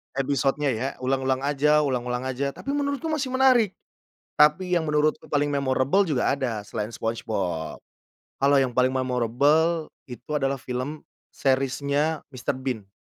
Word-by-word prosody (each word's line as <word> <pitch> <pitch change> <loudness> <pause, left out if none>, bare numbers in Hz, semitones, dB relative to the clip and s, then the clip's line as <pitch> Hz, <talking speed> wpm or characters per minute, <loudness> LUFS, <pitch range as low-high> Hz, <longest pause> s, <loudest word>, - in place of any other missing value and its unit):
Episode-nya 135 +1 0
ya 120 +4 -2 0.2
ulang-ulang 130 0 0
aja, 150 +1 +3
ulang-ulang 125 -2 -2
aja 135 +2 -2
tapi 275 - -5
menurutku 285 +2 -1
masih 280 -4 -1
menarik. 250 -7 +4 0.6
Tapi 150 +5 +4
yang 160 -2 +1
menurutku 150 0 +1
paling 145 0 +1
memorable 140 +7 +2
juga 140 -4 +1
ada 125 -6 -2
selain 105 +2 -5
Spongebob, 95 -8 -3 0.6
kalau 140 +1 +4
yang 130 -2 +1
paling 130 +1 +3
memorable 140 +6 +1 0.2
itu 125 +4 -11
adalah 135 -1 -1
film 130 +5 -4 0.3
series-nya 140 +3 0
Mr. 130 +2 -3
Bean. 125 -7 -5
135 Hz, 135 wpm, -25 LUFS, 125-150 Hz, 0.6 s, menarik